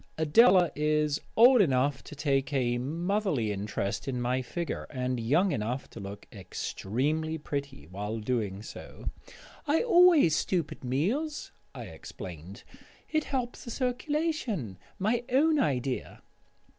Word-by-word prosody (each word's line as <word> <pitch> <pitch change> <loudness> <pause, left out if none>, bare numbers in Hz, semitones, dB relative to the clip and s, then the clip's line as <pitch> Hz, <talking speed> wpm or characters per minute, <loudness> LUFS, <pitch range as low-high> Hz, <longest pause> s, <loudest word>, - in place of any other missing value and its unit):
Adela 175 - +5
is 150 0 +1 0.2
old 245 +1 +8
enough 135 -4 +1
to - - -10
take 140 -1 0
a 120 -3 +1
motherly 165 - -1
interest 100 +1 -3
in 130 -2 -2
my 125 +2 0
figure, 170 +7 -4
and 125 -2 -2
young 155 - +2
enough 120 +3 -2
to - - -9
look 100 0 -8
extremely 140 - -2
pretty 140 - -5
while 100 +6 -5
doing 105 -3 -2
so. - - -8 0.6
"I 305 +7 +3
always 350 - +6
stoop 170 0 0
at - - -10
meals," 215 - -1 0.2
I - - -6
explained; 90 +4 -9 0.5
"it 310 -1 +1
helps 250 -3 -3
the - - -8
circulation. 250 - -2 0.2
My 225 +5 0
own 300 +4 +3
idea." 130 - -2
145 Hz, 130 wpm, -29 LUFS, -, 0.6 s, old